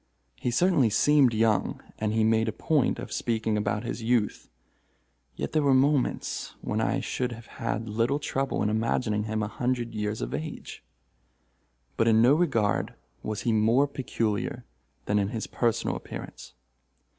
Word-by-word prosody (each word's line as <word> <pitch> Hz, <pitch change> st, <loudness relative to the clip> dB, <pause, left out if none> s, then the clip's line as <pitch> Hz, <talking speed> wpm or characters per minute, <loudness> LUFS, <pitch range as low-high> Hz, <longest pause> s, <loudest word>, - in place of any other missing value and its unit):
He -, -, -2 dB
certainly 140 Hz, -2 st, +3 dB
seemed 140 Hz, +3 st, +4 dB
young—and 110 Hz, -1 st, 0 dB
he 110 Hz, 0 st, +2 dB
made 110 Hz, +1 st, +3 dB
a -, -, +1 dB
point 145 Hz, +5 st, +1 dB
of 120 Hz, +1 st, -7 dB
speaking 110 Hz, -2 st, -1 dB
about 105 Hz, +1 st, -1 dB
his 120 Hz, 0 st, -4 dB
youth—yet 70 Hz, -, -4 dB
there 155 Hz, -, +2 dB
were 140 Hz, -2 st, +4 dB
moments 135 Hz, 0 st, 0 dB
when -, -, -2 dB
I -, -, 0 dB
should 125 Hz, -1 st, -2 dB
have 115 Hz, 0 st, -11 dB, 0.2 s
had 115 Hz, -1 st, -2 dB
little 115 Hz, +6 st, +1 dB
trouble 135 Hz, -2 st, -1 dB
in 105 Hz, -, +1 dB
imagining 110 Hz, -1 st, 0 dB
him 110 Hz, 0 st, -1 dB
a -, -, -1 dB
hundred 120 Hz, +1 st, -2 dB
years 105 Hz, 0 st, -2 dB
of -, -, -4 dB
age. 155 Hz, 0 st, -6 dB, 1.1 s
But 115 Hz, -, +2 dB
in 110 Hz, -1 st, +5 dB
no 120 Hz, +4 st, +6 dB
regard 115 Hz, -11 st, +1 dB, 0.3 s
was 105 Hz, -1 st, -4 dB
he 115 Hz, -, +1 dB
more 115 Hz, +6 st, +3 dB
peculiar 115 Hz, -6 st, -2 dB, 0.4 s
than 105 Hz, 0 st, +2 dB
in 100 Hz, -, +1 dB
his 110 Hz, +1 st, -4 dB
personal 115 Hz, -2 st, 0 dB
appearance. -, -, -8 dB
115 Hz, 155 wpm, -27 LUFS, 110-125 Hz, 1.1 s, no